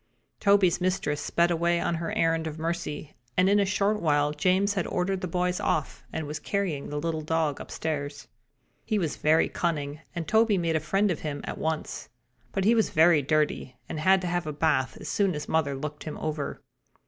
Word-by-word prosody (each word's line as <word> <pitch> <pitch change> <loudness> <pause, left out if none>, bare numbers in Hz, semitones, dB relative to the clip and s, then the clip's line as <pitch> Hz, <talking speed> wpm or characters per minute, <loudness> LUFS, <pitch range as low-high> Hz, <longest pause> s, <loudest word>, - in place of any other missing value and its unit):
Toby's 200 -4 +4
mistress 180 -5 0
sped 170 +3 +2
away 170 +1 +2
on 170 - 0
her 165 0 -3
errand 165 -1 +2
of 155 0 -6
mercy 160 -2 -4 0.2
and 185 - +5
in 205 +1 +4
a 200 - +3
short 205 +2 +1
while 145 -2 +2
James 190 +5 +2
had 190 -4 -1
ordered 185 +1 -1
the 185 - -2
boys 180 +1 0
off 150 - -1
and 160 -1 -3
was 150 +1 -5
carrying 185 -9 -2
the 150 - -4
little 160 +1 -2
dog 155 -2 0
upstairs. 145 -2 -4 0.6
He 215 - 0
was 165 -7 -1
very 155 +1 +3
cunning, 150 -4 -2 0.2
and 165 -2 -3
Toby 220 -2 +4
made 165 -2 0
a - - +3
friend 195 +6 +1
of 170 - -2
him 150 -2 -4
at - - -5
once, 160 -1 -3 0.4
but 190 - -1
he 225 - +6
was 225 -2 +2
very 160 -1 +5
dirty 150 -2 0
and 155 - -4
had 190 +4 +4
to 180 - -3
have 175 -2 -1
a 150 - -3
bath 145 -3 +1
as - - -8
soon 195 -4 +1
as 150 0 -5
mother 145 -3 +1
looked 150 +2 -6
him 155 - -5
over. 150 -2 -3
165 Hz, 205 wpm, -27 LUFS, 150-185 Hz, 0.6 s, he